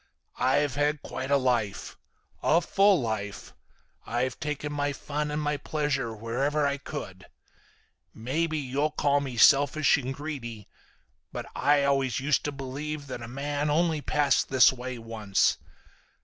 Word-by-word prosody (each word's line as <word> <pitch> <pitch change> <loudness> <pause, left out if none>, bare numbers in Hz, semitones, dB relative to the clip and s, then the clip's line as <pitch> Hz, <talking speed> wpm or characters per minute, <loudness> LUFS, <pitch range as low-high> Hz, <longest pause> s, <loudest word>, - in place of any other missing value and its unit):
"I've 140 +1 +2
had 145 +1 0
quite 130 +1 -5
a 140 - +4
life. 120 -7 -1 0.5
A 165 - +4
full 195 +2 +3
life. 110 -4 -4 0.5
I've 125 +1 -1
taken 150 -1 -3
my 145 0 -1
fun 150 +2 -3
and 150 +1 -2
my 150 -1 -1
pleasure 140 -5 -2
wherever 130 +7 -1
I 140 0 0
could. 95 -11 -8 0.8
Maybe 155 +8 -2
you'll 140 +2 -1
call 145 -1 +1
me 130 -4 -5
selfish 145 +5 +5
and 130 -1 -4
greedy, 130 -7 -6 0.6
but - - -5
I 145 0 +3
always 135 -3 +1
used 140 +1 +1
to 145 - -1
believe 140 +2 -5
that 130 -3 -6
a 115 - -7
man 145 +4 -2
only 160 0 +1
passed 145 -2 +1
this 130 -1 +6
way 130 0 -6
once. 110 -3 0
140 Hz, 145 wpm, -27 LUFS, 125-150 Hz, 0.8 s, this